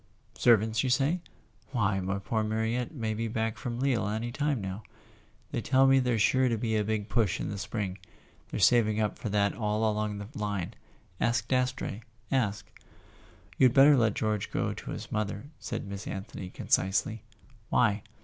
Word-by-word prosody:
"Servants, 110 Hz, -1 st, +4 dB
you 130 Hz, -, 0 dB
say? 140 Hz, +8 st, +2 dB, 0.5 s
Why, 105 Hz, -4 st, +1 dB
my 95 Hz, +1 st, -2 dB
poor 105 Hz, +3 st, -1 dB
Mariette 110 Hz, +4 st, -1 dB
may 115 Hz, -8 st, -2 dB
be 115 Hz, +1 st, -2 dB
back 110 Hz, 0 st, -1 dB
from 120 Hz, +1 st, -5 dB
Lille 130 Hz, -6 st, +1 dB
any 110 Hz, +3 st, -2 dB
time 145 Hz, 0 st, 0 dB
now. 95 Hz, +1 st, -5 dB, 0.7 s
They -, -, -1 dB
tell 130 Hz, +1 st, +4 dB
me 135 Hz, 0 st, +6 dB
there's 120 Hz, -4 st, +2 dB
sure 130 Hz, -1 st, +3 dB
to 115 Hz, -, 0 dB
be 110 Hz, 0 st, -1 dB
a 105 Hz, -, +2 dB
big 105 Hz, -1 st, -2 dB
push 110 Hz, -4 st, +1 dB
in -, -, -3 dB
the 100 Hz, -, -4 dB
spring. 100 Hz, -1 st, -3 dB, 0.5 s
They're -, -, -4 dB
saving 110 Hz, 0 st, +4 dB
up 105 Hz, -1 st, -1 dB
for 110 Hz, -, -3 dB
that 100 Hz, 0 st, +2 dB
all 110 Hz, 0 st, 0 dB
along 105 Hz, -1 st, -1 dB
the 100 Hz, 0 st, -6 dB
line. 100 Hz, -4 st, -3 dB, 0.5 s
Ask 115 Hz, -1 st, +1 dB
Dastrey... 125 Hz, -4 st, -1 dB, 0.3 s
ask.. 110 Hz, -7 st, 0 dB, 0.5 s
" 90 Hz, +1 st, -26 dB
"You'd 130 Hz, -2 st, +5 dB
better 140 Hz, +2 st, +8 dB
let 115 Hz, -5 st, +2 dB
George 110 Hz, -2 st, -1 dB
go -, -, -1 dB
to -, -, -9 dB
his -, -, -6 dB
mother," 105 Hz, +5 st, -3 dB
said 115 Hz, -3 st, -4 dB
Miss 100 Hz, 0 st, -6 dB
Anthony 95 Hz, -1 st, -6 dB
concisely. 95 Hz, +4 st, 0 dB, 0.5 s
"Why?" 105 Hz, -4 st, +3 dB
110 Hz, 180 wpm, -29 LUFS, 105-120 Hz, 0.7 s, better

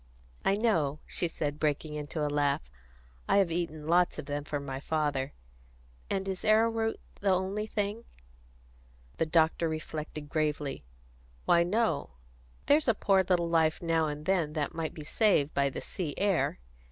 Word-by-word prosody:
"I 195 Hz, -, +3 dB
know," 165 Hz, -10 st, +1 dB
she 175 Hz, -, 0 dB
said, 150 Hz, -2 st, -3 dB
breaking 150 Hz, 0 st, 0 dB
into 150 Hz, +1 st, -3 dB
a -, -, +1 dB
laugh. 145 Hz, -, 0 dB, 0.6 s
"I -, -, +5 dB
have 190 Hz, -4 st, +3 dB
eaten 160 Hz, -3 st, -3 dB
lots 175 Hz, +2 st, +3 dB
of -, -, -5 dB
them 145 Hz, 0 st, -3 dB
for 145 Hz, 0 st, -3 dB
my 135 Hz, -1 st, -5 dB
father. 145 Hz, -2 st, -1 dB, 0.8 s
And 195 Hz, 0 st, -1 dB
is 190 Hz, -1 st, -4 dB
arrowroot 225 Hz, +1 st, +2 dB, 0.2 s
the 200 Hz, -, +1 dB
only 190 Hz, +3 st, 0 dB
thing?" 210 Hz, +2 st, -2 dB, 1.1 s
The 165 Hz, -, +1 dB
doctor 160 Hz, +1 st, +3 dB
reflected 155 Hz, -1 st, -5 dB
gravely. 150 Hz, -2 st, -1 dB, 0.6 s
"Why, 170 Hz, -, +5 dB
no. 175 Hz, -, 0 dB, 0.5 s
There's 295 Hz, +1 st, +4 dB
a 230 Hz, -, +4 dB
poor 195 Hz, -1 st, +3 dB
little 175 Hz, -2 st, +1 dB
life 160 Hz, -2 st, +2 dB
now 165 Hz, -2 st, +1 dB
and 150 Hz, 0 st, -5 dB
then 170 Hz, -5 st, +1 dB
that 150 Hz, -2 st, -2 dB
might 160 Hz, -1 st, -3 dB
be 155 Hz, -, -7 dB
saved 155 Hz, -4 st, +2 dB
by 140 Hz, 0 st, +2 dB
the -, -, -6 dB
sea 160 Hz, -6 st, -4 dB
air. 195 Hz, -3 st, +1 dB
160 Hz, 160 wpm, -30 LUFS, 150-195 Hz, 1.1 s, I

